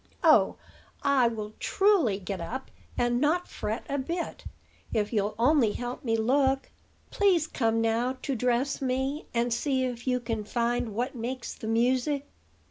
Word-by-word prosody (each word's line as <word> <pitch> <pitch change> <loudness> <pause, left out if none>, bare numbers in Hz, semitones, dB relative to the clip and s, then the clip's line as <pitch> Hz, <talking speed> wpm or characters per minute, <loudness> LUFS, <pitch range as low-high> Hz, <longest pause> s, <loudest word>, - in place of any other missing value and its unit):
"Oh! - - +5 0.5
I 275 -4 +4
will, 215 -2 -4
truly, 385 - +3
get 195 -1 -5
up, 255 +10 -5 0.3
and 240 0 +1
not 330 +5 +2
fret 220 +2 -4
a 280 - -1
bit, 335 +6 -4 0.5
if 210 +1 0
you'll 205 -1 0
only 240 -3 +4
help 245 0 -5
me 225 -3 +1
look. 265 +4 +2 0.4
Please 375 -6 +3
come 225 -7 0
now 235 +3 +1
to 275 - -1
dress 250 +4 0
me, 265 +3 -1
and 235 0 +1
see 260 +1 0
if 245 0 -5
you 250 -1 +2
can 225 -3 -3
find 235 0 -1
what 250 +4 -1
makes 245 +1 -4
the 220 - -8
music." 255 +5 +1
245 Hz, 155 wpm, -28 LUFS, 225-275 Hz, 0.5 s, Oh